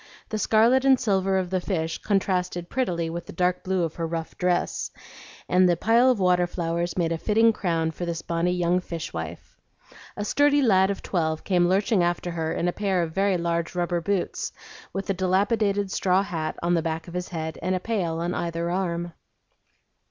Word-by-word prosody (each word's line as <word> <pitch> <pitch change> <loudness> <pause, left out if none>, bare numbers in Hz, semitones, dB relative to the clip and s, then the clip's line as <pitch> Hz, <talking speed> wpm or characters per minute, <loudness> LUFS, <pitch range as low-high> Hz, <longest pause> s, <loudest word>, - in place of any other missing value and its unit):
The 215 - -2
scarlet 230 +5 +4
and 265 -2 +5
silver 195 -2 +1
of 185 -1 -2
the 185 -1 0
fish 165 -4 -2
contrasted 180 -3 -1
prettily 175 -11 -1
with 170 +1 -5
the - - -8
dark 180 +1 0
blue 190 -2 0
of 165 -2 -2
her 165 -1 -2
rough 165 0 -5
dress, 180 -1 0 0.6
and 180 0 +4
the 175 - +2
pile 230 +7 +4
of 250 -5 +2
water 180 -1 +3
flowers 170 0 -2
made 170 -2 +1
a 165 - -1
fitting 225 +3 +3
crown 165 -5 -1
for 175 - -7
this 170 -1 -3
bonny 170 +1 0
young 180 0 +1
fish 170 -3 -6
wife. 80 +1 -7 0.6
A 205 - -2
sturdy 290 +4 +3
lad 190 -5 +4
of 200 - -3
twelve 160 -3 -1
came 180 -2 +2
lurching 200 +1 +2
after 175 0 0
her 160 -1 -2
in 175 - -1
a 175 - 0
pair 195 -4 0
of 165 - -4
very 195 0 +2
large 170 0 -2
rubber 175 -1 0
boots, 195 0 -2 0.4
with 195 - -4
a - - +1
dilapidated 200 +2 +1
straw 190 0 +2
hat 160 -5 -4
on 175 +1 +2
the 170 - +2
back 160 +1 -3
of 170 - -9
his 180 0 -3
head 160 -2 -5
and 185 +2 0
a - - -1
pail 180 -6 -2
on 175 +1 -1
either 170 0 -2
arm. 175 -2 -2
180 Hz, 200 wpm, -25 LUFS, 170-195 Hz, 0.6 s, and